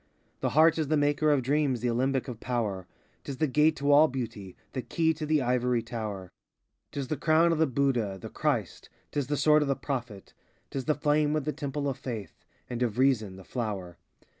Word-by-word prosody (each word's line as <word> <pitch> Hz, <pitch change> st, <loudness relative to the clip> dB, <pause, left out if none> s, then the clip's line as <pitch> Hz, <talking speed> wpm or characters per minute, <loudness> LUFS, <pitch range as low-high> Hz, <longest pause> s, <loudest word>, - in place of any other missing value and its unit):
The -, -, 0 dB
heart 160 Hz, +1 st, +6 dB
is 155 Hz, -, 0 dB
the 155 Hz, +1 st, +2 dB
maker 145 Hz, +1 st, +2 dB
of 145 Hz, -3 st, +3 dB
dreams, 140 Hz, -2 st, +1 dB
the 125 Hz, -, 0 dB
alembic 130 Hz, +3 st, 0 dB
of 120 Hz, -4 st, -6 dB
power: 105 Hz, -8 st, -2 dB, 0.4 s
*T -, -, -5 dB
is 135 Hz, -, -6 dB
the 155 Hz, -, +2 dB
gate 150 Hz, +2 st, +3 dB
to 140 Hz, +1 st, +1 dB
all 150 Hz, +2 st, +7 dB
beauty, 115 Hz, -8 st, -6 dB, 0.2 s
the 130 Hz, -, -2 dB
key 160 Hz, +4 st, +1 dB
to 155 Hz, 0 st, -5 dB
the 155 Hz, -3 st, +2 dB
ivory 125 Hz, -1 st, +1 dB
tower; 105 Hz, -6 st, -5 dB, 0.6 s
89 -, -, -53 dB
'T -, -, -4 dB
is 135 Hz, -, -5 dB
the 155 Hz, -, -1 dB
crown 160 Hz, +3 st, +4 dB
of 165 Hz, -, 0 dB
the 160 Hz, -, +4 dB
Budha, 125 Hz, -7 st, 0 dB
the -, -, -8 dB
Christ, -, -, -2 dB, 0.2 s
't -, -, -1 dB
is 135 Hz, -, -2 dB
the 145 Hz, +1 st, -1 dB
sword 150 Hz, +1 st, +5 dB
of 150 Hz, -, 0 dB
the 135 Hz, -, +1 dB
Prophet; 120 Hz, -9 st, -5 dB, 0.4 s
'T 135 Hz, -, -2 dB
the 140 Hz, +3 st, 0 dB
flame 150 Hz, 0 st, +2 dB
in 155 Hz, -, 0 dB
the 150 Hz, +1 st, -2 dB
temple 145 Hz, 0 st, -3 dB
of 135 Hz, -1 st, -3 dB
faith, 115 Hz, -7 st, -7 dB, 0.2 s
and 120 Hz, 0 st, -5 dB
of 120 Hz, -3 st, 0 dB
reason, 120 Hz, -7 st, +2 dB
the 95 Hz, -, -11 dB
flower. 95 Hz, -8 st, -4 dB
135 Hz, 225 wpm, -28 LUFS, 120-150 Hz, 0.6 s, all